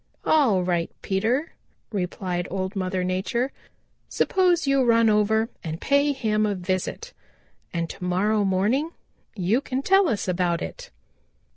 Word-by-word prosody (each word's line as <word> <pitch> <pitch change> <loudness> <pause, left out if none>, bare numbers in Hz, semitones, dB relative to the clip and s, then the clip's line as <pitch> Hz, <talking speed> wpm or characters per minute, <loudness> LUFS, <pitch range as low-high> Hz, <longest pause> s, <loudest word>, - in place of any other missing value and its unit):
"All 245 -12 +3
right, 175 -2 0
Peter," 225 +10 0 0.4
replied 180 -2 -3
Old 190 +2 -3
Mother 185 -1 -1
Nature, 190 +8 -1 0.6
"suppose 360 -4 +2
you 275 -1 +3
run 230 -2 +4
over 220 +1 +2 0.2
and 160 0 -5
pay 280 +1 +2
him 215 -6 0
a 205 - -1
visit 185 - -3 0.6
and 170 -1 -2
to 180 - -9
morrow 205 +4 +1
morning 205 - +1 0.5
you 205 +6 +1
can 265 -1 -3
tell 385 0 +4
us 210 - -2
about 180 -2 0
it." 80 - -8
210 Hz, 135 wpm, -24 LUFS, 185-260 Hz, 0.6 s, run